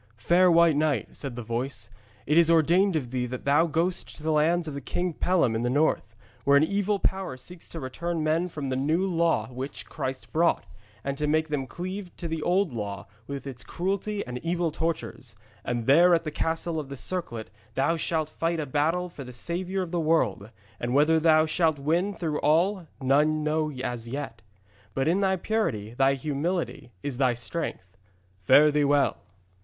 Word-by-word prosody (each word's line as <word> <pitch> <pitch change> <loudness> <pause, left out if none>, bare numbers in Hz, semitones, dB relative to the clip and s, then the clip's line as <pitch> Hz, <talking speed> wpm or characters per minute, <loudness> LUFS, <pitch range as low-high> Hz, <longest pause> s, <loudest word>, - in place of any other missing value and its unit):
'Fair 175 +10 +4
White 170 -2 +5
Knight,' 145 -6 0
said 135 -4 -5
the 120 - -5
voice, 115 -1 -3 0.3
'it 150 - +1
is 170 0 +6
ordained 170 +4 +4
of 130 -6 -2
thee 125 -1 -1
that 125 +1 -6
thou 145 +4 +4
goest 170 +3 -1
to 150 - -13
the 160 - +1
lands 160 +3 +2
of 155 - -4
the 140 - -5
King 175 +6 -2
Pellam 170 -8 +2
in 110 - -1
the 120 - 0
north, 130 -5 +1 0.3
where 140 +2 +5
an 140 - +5
evil 200 +3 +1
power 190 -8 -1
seeks 170 +7 -10
to 155 -6 -5
turn 170 +1 -2
men 160 +3 +1
from 145 -5 -5
the 130 - -1
New 155 +8 +1
Law 165 - +1
which 130 +2 -6
Christ 130 0 -5
brought, 170 +2 +2 0.4
and 140 +1 -3
to 150 - 0
make 155 +1 +1
them 140 -3 -2
cleave 185 +4 -5
to 170 - -4
the 160 -1 -3
Old 180 -2 +1
Law 100 -3 -4 0.2
with 140 -1 -5
its 130 -2 -6
cruelty 200 +3 -2
and 125 0 -5
evil 170 +2 -1
tortures. 165 +2 -3 0.3
And 120 -2 -2
there 170 +7 +6
at 165 - -1
the 155 - -4
Castle 160 +1 -1
of 145 -3 -6
the 140 - -6
Circlet 120 - -3 0.2
thou 150 +5 +2
shalt 155 -1 -1
fight 165 0 -1
a 155 - -1
battle 155 +6 0
for 160 -5 -9
the 125 - -9
Saviour 180 +8 -2
of 170 - -7
the 175 - 0
world. 140 - +1 0.3
And 120 +2 -2
whether 155 +3 +5
thou 155 -1 +5
shalt 160 -1 +1
win 170 +8 0
through 155 -4 -2
all, 170 +4 +2
none 150 +3 +2
know 155 0 0
as 125 -3 -4
yet. 125 -3 -5 0.5
But 135 +2 0
in 180 +5 +2
thy 190 -1 +3
purity, 145 - -1
thy 135 +2 +3
humility, 150 -1 -3
is 135 -3 -4
thy 130 -3 +3
strength. 115 - -5 0.5
Fare 150 +11 +6
thee 150 0 +2
well!' 145 0 +3
155 Hz, 195 wpm, -27 LUFS, 135-170 Hz, 0.5 s, is